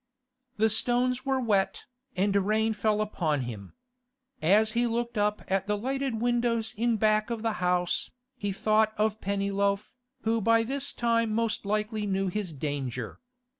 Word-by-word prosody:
The 220 +1 +3
stones 250 +3 +1
were 265 -1 +2
wet, 205 -6 0 0.3
and 195 +2 +1
rain 215 +3 +2
fell 215 0 +1
upon 160 -9 0
him. 110 -6 -7 0.7
As 210 +7 +4
he 240 +2 +1
looked 235 +1 -2
up 210 0 0
at 190 +1 0
the 210 0 +1
lighted 265 +1 -2
windows 235 -1 0
in 235 +2 +1
the - - 0
back 215 +1 +2
of 230 -2 -3
the 225 - +1
house, 180 -1 +1 0.3
he 205 -5 -3
thought 215 +2 +2
of 215 +1 0
Pennyloaf, 200 +1 0 0.3
who 225 0 +1
by 230 +2 +4
this 275 +4 -2
time 230 -1 +1
most 225 -2 -1
likely 215 0 -1
knew 195 -1 0
his 195 -1 -3
danger. 135 -5 -4
215 Hz, 160 wpm, -28 LUFS, 195-230 Hz, 0.7 s, As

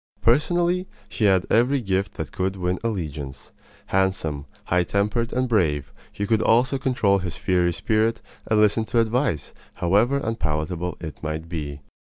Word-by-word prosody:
Personally, 175 +8 +2 0.2
he 110 - -1
had 95 -2 +4
every 125 +5 +4
gift 95 -4 -1
that - - -5
could 95 +1 -1
win 90 -1 -1
allegiance. 75 -11 -4 0.3
Handsome, 80 -7 0 0.2
high 90 0 +2
tempered, 105 +6 0
and 130 +1 0
brave, 80 - +1 0.2
he 100 - -3
could 110 +1 +2
also 125 +4 +3
control 110 -7 +2
his 90 -2 -5
fiery 90 -2 +2
spirit 110 +6 +1 0.3
and 110 - +3
listen 105 +1 +4
to 115 +3 +1
advice, 115 - 0 0.2
however 105 +10 +2
unpalatable 90 - -2
it 80 -3 -7
might 80 +1 -4
be. 75 -4 -5
100 Hz, 150 wpm, -24 LUFS, 85-115 Hz, 0.3 s, had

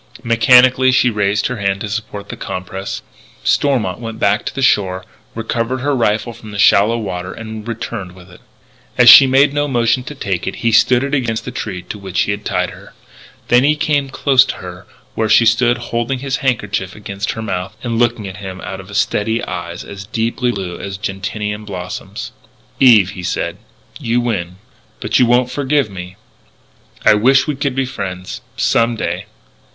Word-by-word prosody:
Mechanically 125 +2 +5
she 125 -1 +3
raised 105 -1 0
her 125 - -2
hand 100 -1 -1
to 105 - -3
support 105 -1 -5
the - - -5
compress. 95 +1 -6 0.4
Stormont 120 -10 +1
went 115 -2 -6
back 105 0 +1
to - - -5
the 135 - -2
shore, 95 -6 +2 0.3
recovered 115 +2 -2
her 145 +1 0
rifle 115 0 0
from 110 - -12
the 100 - -7
shallow 105 +3 +4
water, 90 -5 -4
and 110 -1 -8
returned 115 -5 -5
with 90 0 -16
it. 90 - -16 0.6
As 120 -1 +9
she 135 +2 +10
made 135 +2 +4
no 145 0 0
motion 120 -1 +1
to 150 - -7
take 95 -9 -3
it, - - -3
he 115 - +4
stood 125 +3 +4
it 140 +1 -3
against 120 -5 -1
the 125 - -5
tree 95 -7 -5
to 105 - -8
which 95 -2 -2
he - - 0
had 100 +1 -4
tied 90 -2 -1
her. - - -14 0.6
Then 120 +1 +5
he 150 +2 +3
came 145 -2 0
close 135 -1 +4
to - - -4
her 90 -1 -10 0.3
where 110 -1 -1
she 115 - +5
stood 120 +1 +3 0.2
holding 120 +3 0
his 135 +1 -2
handkerchief 105 -8 -2
against 100 0 -4
her 110 - -6
mouth 95 0 -4
and 115 -2 -2
looking 120 -4 +1
at 95 +1 -8
him 95 -2 -7
out 95 - -6
of 100 +2 -6
steady 110 +2 0
eyes 85 0 -6
as 100 0 -9
deeply 115 +3 -1
blue 95 -5 -5
as 95 -1 -6
gentian 105 +2 -4
blossoms. 90 - -6 0.5
"Eve," 110 -8 +6
he 90 - -8
said, 90 - -3 0.4
"you 120 +1 0
win. 100 -8 -2 0.4
But - - +1
you 125 - +5
won't 125 +1 +2
forgive 140 -3 0
me.... 90 -1 -8 0.9
I - - +7
wish 130 +6 +4
we 150 - -1
could 140 -1 -2
be 135 0 0
friends, 95 -7 -6 0.2
some 115 0 +2
day.... 90 -1 -3
110 Hz, 190 wpm, -17 LUFS, 95-125 Hz, 0.9 s, she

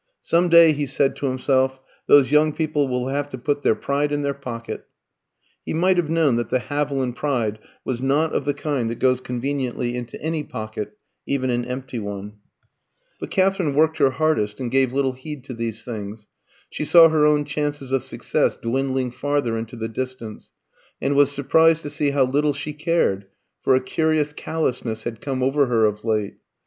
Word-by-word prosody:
"Some 175 +1 +2
day," 170 -1 +8
he 145 -1 -2
said 135 0 +1
to 140 - -2
himself, 130 0 +1 0.3
"those 140 -3 +6
young 150 0 +4
people 155 -2 0
will 125 0 -2
have 145 +1 -2
to 130 - -6
put 145 +3 -1
their 110 - +3
pride 140 +6 -1
in 145 0 -1
their 140 0 0
pocket." 120 -4 -7 0.8
He - - -4
might 180 +3 +3
have 170 -3 +1
known 160 -7 +2
that 120 -2 -2
the - - +2
Haviland 135 -1 -2
pride 120 -7 -1 0.3
was 125 -1 -3
not 145 +4 +1
of - - 0
the 145 - 0
kind 135 -7 -2
that 115 - -4
goes 130 -1 +2
conveniently 125 -1 -3
into 120 -1 -6
any 160 0 -2
pocket, 110 -3 -6 0.3
even 130 -2 0
an 120 0 -1
empty 125 -1 -5
one. 100 0 -6 0.8
But - - -6
Katherine 190 -6 +1
worked 160 +1 +3
her 140 -2 +5
hardest, 130 -7 0
and 125 -3 -3
gave 135 -1 +2
little 135 0 0
heed 135 +1 -8
to 130 - -7
these 115 -2 -4
things. 105 -2 -7 0.4
She - - -4
saw 165 +1 +7
her 155 -1 +2
own 150 -1 +3
chances 145 -2 -3
of 135 -2 +1
success - - 0
dwindling 130 +1 -1
farther 140 -2 -1
into 115 +1 -5
the 110 -1 -4
distance, 115 -2 -6 0.5
and 140 - 0
was 140 0 +5
surprised 160 +4 +3
to 145 - -6
see 150 -1 0
how 140 -1 +2
little 145 +3 +1
she 150 +2 -5
cared, 150 - 0 0.3
for - - +3
a - - +4
curious 155 +2 0
callousness 125 -8 -3
had 115 -1 -5
come 130 -2 -2
over 135 +1 +2
her 115 -3 +3
of 105 0 -1
late. 110 -3 -1
135 Hz, 190 wpm, -22 LUFS, 120-150 Hz, 0.8 s, day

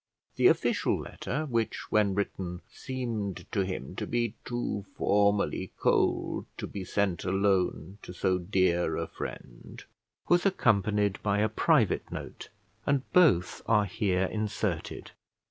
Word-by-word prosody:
The - - +5
official - - +2
letter, 150 +5 -4
which, 115 -5 -2
when 105 -3 +3
written, 95 -3 -3
seemed 110 -8 -4
to 100 - +1
him 95 -8 -5
to - - -3
be 120 -2 0
too 120 -4 -2
formally 100 0 +1
cold - - +1
to - - -4
be 100 - -6
sent 95 -2 -1
alone 95 -1 0
to - - -9
so 90 0 0
dear 90 -2 +1
a 85 - -1
friend, - - -9 0.4
was 175 0 +4
accompanied 105 - +2
by 100 -1 +1
a 110 +1 +2
private 115 - +2
note; - - -7 0.4
and 140 -2 +2
both 145 - +4
are 105 -2 +4
here 95 -2 0
inserted. 105 +2 -3
100 Hz, 130 wpm, -29 LUFS, 95-115 Hz, 0.4 s, The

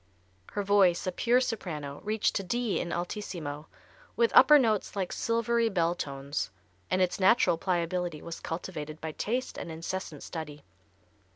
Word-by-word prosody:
Her 205 - -1
voice, 195 -3 +4
a 185 - 0
pure 240 +7 +3
soprano, 160 - -4
reached 215 0 +1
to - - -1
D 235 +1 -1
in 170 - -3
alt., 175 +4 -2 1.0
with 470 -1 +3
upper 300 - +9
notes 220 -8 +1
like 190 -3 -2
silvery 230 0 +1
bell 170 -4 +1
tones, 140 - -4 0.4
and 185 0 +3
its 180 - -1
natural 190 -4 +4
pliability 175 -2 -1
was 170 -1 -6
cultivated 160 -2 -5
by 160 - -4
taste 245 +10 -3
and 170 - -6
incessant 165 -1 -5
study. 150 -3 -7
180 Hz, 150 wpm, -29 LUFS, 165-220 Hz, 1.0 s, upper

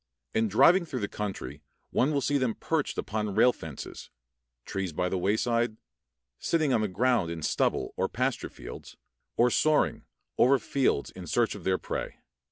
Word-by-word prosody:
In 110 0 +2
driving 140 - +5
through 135 -7 -5
the 100 - -1
country 95 -10 -5 0.3
one 135 +5 +2
will 140 -2 +1
see 145 +2 +1
them 125 -4 0
perched 160 -3 -1
upon 105 -2 -2
rail 125 +3 +5
fences, 80 -4 -8 0.6
trees 95 -4 -3
by 90 +3 0
the 95 - -1
wayside, 115 +4 +1 0.6
sitting 155 -5 +1
on 115 - +3
the 105 - +1
ground 110 -1 +1
in 85 -2 -5
stubble - - 0
or - - 0
pasture - - -1
fields, - - -10 0.4
or 120 +1 +4
soaring, 155 +4 +2 0.3
over 135 +3 +6
fields 130 - 0
in - - -9
search - - +1
of - - -10
their 95 -1 +2
prey. - - -4
115 Hz, 170 wpm, -28 LUFS, 95-135 Hz, 0.6 s, over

